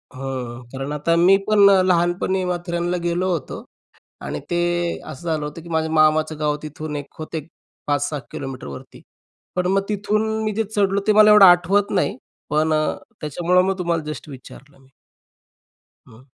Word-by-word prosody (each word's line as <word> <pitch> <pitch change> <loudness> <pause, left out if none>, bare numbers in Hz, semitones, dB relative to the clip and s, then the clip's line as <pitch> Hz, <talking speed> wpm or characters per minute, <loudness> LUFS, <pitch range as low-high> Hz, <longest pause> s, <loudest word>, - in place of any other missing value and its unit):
हं. 130 -2 -6
कारण 135 +1 -5
आता 150 +3 0
मी 175 +3 +5
पण 205 -2 +6
अ, 195 -1 +5
लहानपणी 180 +1 +1
माथेरानला 175 0 -2
गेलो 175 +2 0
होतो. 165 -6 -4 0.6
आणि 75 - -5
ते 175 - 0 0.5
असं 155 +2 -10
झालं 155 -2 -1
होतं 150 +3 -7
की 170 - -12
माझ्या 160 -1 -1
मामाचं 155 0 +2
गाव 150 -1 0
तिथून 155 0 -6
एक 145 -1 -4
होत 155 +1 -7 0.5
5-6 145 +1 -1
किलोमीटरवरती. 125 - -8 0.5
पण 180 0 0
मग 195 +1 +2
तिथून 210 +1 0 0.2
मी 215 - -1
जे 225 - +1
चढलो 200 -2 0
ते 215 - +5
मला 215 0 +7
एवढं 210 -2 +9
आठवत 185 +3 +4
नाही 210 - 0 0.3
पण 155 +2 +1
अ, 155 0 0 0.3
त्याच्यामुळं 175 +4 +1
मग 190 0 -1
तुम्हाला 170 -2 -1
जस्ट 155 - -9
विचारलं 135 +1 -13
मी. 135 0 -25 1.2
हं. 115 +3 -17
170 Hz, 160 wpm, -21 LUFS, 150-185 Hz, 1.2 s, एवढं